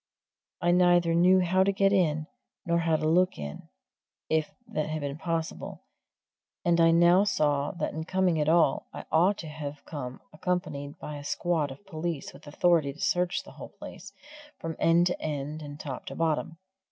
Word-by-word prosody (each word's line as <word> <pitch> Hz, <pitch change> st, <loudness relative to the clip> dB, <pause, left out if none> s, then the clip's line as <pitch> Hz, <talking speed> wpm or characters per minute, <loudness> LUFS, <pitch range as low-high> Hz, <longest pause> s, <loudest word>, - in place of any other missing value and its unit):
I 175 Hz, -, +4 dB
neither 175 Hz, -1 st, +4 dB
knew 180 Hz, +2 st, +5 dB
how 185 Hz, +1 st, +3 dB
to 200 Hz, -, +2 dB
get 195 Hz, 0 st, +2 dB
in, 155 Hz, -5 st, +2 dB, 0.4 s
nor 170 Hz, 0 st, +2 dB
how 165 Hz, -1 st, +2 dB
to 155 Hz, -, 0 dB
look 180 Hz, +3 st, +3 dB
in, 75 Hz, -1 st, -7 dB, 0.6 s
if 155 Hz, -1 st, +1 dB, 0.2 s
that 155 Hz, 0 st, -2 dB
had 155 Hz, 0 st, -3 dB
been 140 Hz, +1 st, -4 dB
possible; 165 Hz, -1 st, -4 dB, 0.8 s
and 170 Hz, -1 st, +4 dB
I 165 Hz, -, +6 dB
now 175 Hz, +3 st, +5 dB
saw 145 Hz, -8 st, +1 dB
that 175 Hz, -, -3 dB
in 160 Hz, +1 st, -4 dB
coming 185 Hz, -3 st, +1 dB
at 150 Hz, -, +1 dB
all 165 Hz, -4 st, +3 dB
I -, -, -8 dB
ought 180 Hz, +5 st, +4 dB
to 165 Hz, -, -7 dB
have 150 Hz, -1 st, -7 dB
come 130 Hz, -4 st, -6 dB
accompanied 155 Hz, -4 st, -3 dB
by 150 Hz, -1 st, -7 dB
a 145 Hz, -, -8 dB
squad 160 Hz, -1 st, 0 dB
of 135 Hz, +10 st, -11 dB
police 165 Hz, -4 st, -4 dB
with 145 Hz, +2 st, -15 dB
authority 155 Hz, -2 st, +2 dB
to 150 Hz, -, -18 dB
search 180 Hz, 0 st, 0 dB
the -, -, -13 dB
whole -, -, -10 dB
place, -, -, -11 dB, 0.5 s
from 165 Hz, -1 st, -5 dB
end 170 Hz, +1 st, +4 dB
to 180 Hz, -, -1 dB
end 150 Hz, 0 st, -4 dB
and 145 Hz, 0 st, -8 dB
top 135 Hz, -4 st, -6 dB
to -, -, -6 dB
bottom. 165 Hz, 0 st, -1 dB
165 Hz, 185 wpm, -28 LUFS, 150-175 Hz, 0.8 s, I